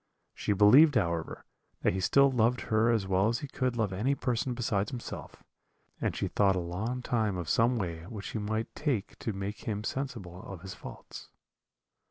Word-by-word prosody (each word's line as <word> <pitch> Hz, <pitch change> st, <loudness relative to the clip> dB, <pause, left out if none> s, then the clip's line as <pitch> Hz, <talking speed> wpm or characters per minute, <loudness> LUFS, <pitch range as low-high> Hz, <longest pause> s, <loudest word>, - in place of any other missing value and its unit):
She 105 Hz, -, -1 dB
believed, 130 Hz, +10 st, +7 dB
however, 85 Hz, -6 st, -1 dB, 0.4 s
that -, -, +3 dB
he 95 Hz, -, -1 dB
still 140 Hz, +9 st, +4 dB
loved 120 Hz, 0 st, +2 dB
her 110 Hz, +1 st, +2 dB
as 110 Hz, -4 st, +2 dB
well 95 Hz, +1 st, +2 dB
as 115 Hz, +1 st, 0 dB
he 145 Hz, -, -4 dB
could 130 Hz, -2 st, -1 dB
love 105 Hz, -4 st, 0 dB
any 120 Hz, +9 st, +1 dB
person 125 Hz, -1 st, -1 dB
besides 105 Hz, -4 st, 0 dB
himself, 120 Hz, -2 st, -8 dB, 0.6 s
and -, -, 0 dB
she -, -, -1 dB
thought 100 Hz, -2 st, +3 dB
a -, -, 0 dB
long 105 Hz, +9 st, -3 dB
time 110 Hz, -6 st, 0 dB
of 85 Hz, -3 st, -4 dB
some 120 Hz, +7 st, +3 dB
way 85 Hz, -5 st, -4 dB
which 105 Hz, -2 st, -7 dB
she 110 Hz, -, -3 dB
might 110 Hz, +2 st, -2 dB
take 135 Hz, -10 st, -2 dB
to 110 Hz, -, -2 dB
make 100 Hz, +1 st, -5 dB
him 105 Hz, -1 st, -2 dB
sensible 110 Hz, -9 st, -4 dB
of 95 Hz, -4 st, -9 dB
his 95 Hz, 0 st, -7 dB
faults. -, -, -10 dB
110 Hz, 190 wpm, -30 LUFS, 95-120 Hz, 0.6 s, believed